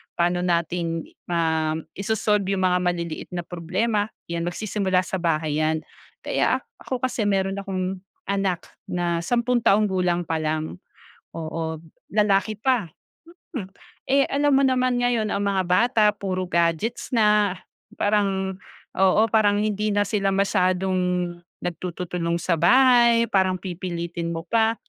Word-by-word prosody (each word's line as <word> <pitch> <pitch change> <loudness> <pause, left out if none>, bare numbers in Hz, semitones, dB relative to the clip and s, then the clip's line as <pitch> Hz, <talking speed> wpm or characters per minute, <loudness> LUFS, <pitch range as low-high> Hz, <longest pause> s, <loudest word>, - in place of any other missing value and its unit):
paano 175 +1 +1
natin 170 -1 -1
i - - -17 0.2
ma 160 -2 +1 0.2
iso-solve 205 -1 0
yung 190 - -1
mga 180 0 +3
maliliit 175 -2 -2
na 175 - -3
problema, 190 +6 -1 0.2
yan, 170 0 -2
magsisimula 190 -1 0
sa 190 - -3
bahay 155 -3 0
yan. 155 0 0 0.4
Kaya - - +1
ak - - -26 0.2
ako 255 -1 -3
kasi, 240 -4 0
meron 195 0 0
akong 190 -1 -3 0.3
anak 195 -3 0 0.2
na 175 -1 -1
sampung 240 +7 +1
taong 210 -1 +4
gulang 180 -2 +1
palang, 155 0 -2 0.6
oo, 160 0 -4 0.3
lalaki 210 0 +2
pa, 245 -5 +1 0.7
mm. 195 -7 -5 0.4
Eh 275 0 +4
alam 285 +1 +1
mo 270 - +5
naman 255 -1 +1
ngayon 235 -3 +1
ang - - 0
mga 195 -2 +1
bata 220 +6 +3
puro 190 -3 -3
gadgets 170 +6 0
na, 210 -3 +3 0.4
parang, 195 -2 0 0.4
oo, 190 +2 +5
parang 205 -2 +4
hindi 210 0 0
na 205 - +3
sila 200 -1 -1
masyadong 190 -1 +1 0.7
nagtututulong 175 0 -3
sa 170 -1 0
bahay, 235 +4 +5
parang 190 -1 +3
pipilitin 170 -2 -4
mo 165 - -4
pa, 225 +2 +2
190 Hz, 135 wpm, -24 LUFS, 170-210 Hz, 0.7 s, mo